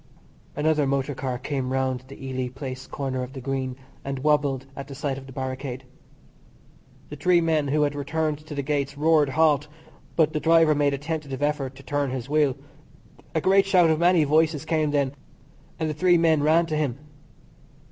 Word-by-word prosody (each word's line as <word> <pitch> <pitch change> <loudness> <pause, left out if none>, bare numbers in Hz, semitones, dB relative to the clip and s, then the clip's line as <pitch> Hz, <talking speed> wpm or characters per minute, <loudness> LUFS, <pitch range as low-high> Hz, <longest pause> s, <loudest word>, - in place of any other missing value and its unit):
Another 150 -1 +2
motor 140 +1 0
car 130 -1 -3
came 130 0 -3
round 130 -1 -1
the 135 0 -10
Ely 130 -1 -2
Place 130 0 -7
corner 130 -2 -3
of 125 +1 -6
the 135 - -7
Green 130 0 -3 0.3
and 135 0 -4
wobbled 140 -2 +1
at 140 0 -7
the 140 - -9
sight 135 0 -3
of 135 - -13
the - - -10
barricade. 130 0 -5 1.3
The 150 - -7
three 175 +4 +3
men 160 -3 +1
who 150 +2 +2
had 145 0 0
returned 150 +1 -2
to 150 - -6
the 140 - -2
gates 140 0 -2
roared 155 -1 +3
"Halt," 150 0 +3 0.5
but 155 -2 +3
the 155 - 0
driver 165 -1 +5
made 145 -1 +2
a - - -5
tentative 145 -2 -4
effort 140 -3 -1
to 135 - -13
turn 145 0 -1
his 125 -1 -4
wheel. 145 -3 +2 0.8
A 160 - +2
great 195 +2 +4
shout 180 -4 +5
of 155 - +1
many 175 -1 +4
voices 155 +1 +2
came 155 -2 +1
then, 140 -2 0 0.7
and 160 - 0
the 155 - -2
three 175 +3 +4
men 160 -2 +3
ran 160 +3 +4
to 155 -2 -3
him. 145 -5 -1
145 Hz, 190 wpm, -25 LUFS, 135-155 Hz, 1.3 s, driver